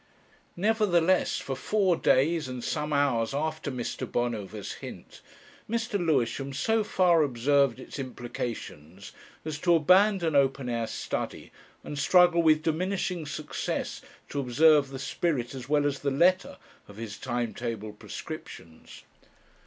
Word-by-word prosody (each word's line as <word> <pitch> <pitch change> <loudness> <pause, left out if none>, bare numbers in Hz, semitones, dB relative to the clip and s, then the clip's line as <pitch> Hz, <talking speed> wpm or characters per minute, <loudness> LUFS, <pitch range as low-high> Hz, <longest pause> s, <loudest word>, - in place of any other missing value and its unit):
Nevertheless, 185 -3 +2
for 135 - -4
four 190 +5 +1
days 155 +2 +2
and 125 -2 -6
some 150 0 -2
hours 135 -4 +1
after 155 0 -2
Mr. 125 -3 -4
Bonover's 110 -4 -3
Hint, - - -10 0.5
Mr. 225 -4 -1
Lewisham 135 -3 0
so 220 +10 +1
far 180 -5 +3
observed 140 -1 +2
its 130 - -9
implications 115 - -6 0.3
as 155 -2 -4
to 175 +1 +4
abandon 185 0 +4
open 135 -2 +2
air 115 -1 -1
study - - -5 0.3
and 145 - -6
struggle 175 +3 +5
with 155 -1 +4
diminishing 180 0 -1
success 150 0 -4 0.3
to 145 - -3
observe 140 +2 +4
the 135 - -7
spirit 135 -2 -2
as 130 -1 -8
well 145 -1 +3
as 140 -2 -1
the 140 - -1
letter 175 +7 +2 0.3
of 100 - -13
his 110 -3 -7
time 120 -1 -2
table 110 -3 -5
prescriptions. 80 -5 -10
145 Hz, 130 wpm, -28 LUFS, 120-170 Hz, 0.5 s, struggle